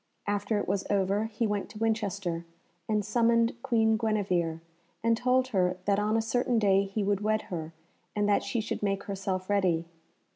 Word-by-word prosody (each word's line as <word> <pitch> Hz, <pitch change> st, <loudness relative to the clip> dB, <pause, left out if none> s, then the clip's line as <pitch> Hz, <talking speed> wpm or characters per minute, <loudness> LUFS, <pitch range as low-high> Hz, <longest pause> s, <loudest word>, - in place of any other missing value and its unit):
After 205 Hz, +1 st, 0 dB
it 205 Hz, -, -2 dB
was 200 Hz, -1 st, 0 dB
over, 200 Hz, +1 st, +1 dB
he 225 Hz, +1 st, -2 dB
went 205 Hz, -2 st, -2 dB
to -, -, -11 dB
Winchester 200 Hz, -6 st, -1 dB, 0.5 s
and 210 Hz, -2 st, +1 dB
summoned 230 Hz, +1 st, +3 dB
Queen 225 Hz, -4 st, +2 dB
Guenevere, 185 Hz, -7 st, 0 dB, 0.4 s
and 230 Hz, 0 st, +4 dB
told 255 Hz, +2 st, +2 dB
her 185 Hz, -5 st, +1 dB
that 200 Hz, 0 st, +2 dB
on 215 Hz, +2 st, +1 dB
a 225 Hz, -, +1 dB
certain 245 Hz, +1 st, +1 dB
day 200 Hz, -2 st, +4 dB
he 200 Hz, +2 st, -2 dB
would 200 Hz, 0 st, +1 dB
wed 215 Hz, +1 st, +1 dB
her 160 Hz, -2 st, -4 dB, 0.4 s
and 205 Hz, -1 st, +1 dB
that 205 Hz, -, +3 dB
she 220 Hz, +3 st, -2 dB
should -, -, -4 dB
make 200 Hz, -1 st, 0 dB
herself 190 Hz, -1 st, -3 dB
ready. 185 Hz, -5 st, +1 dB
205 Hz, 180 wpm, -29 LUFS, 195-225 Hz, 0.5 s, and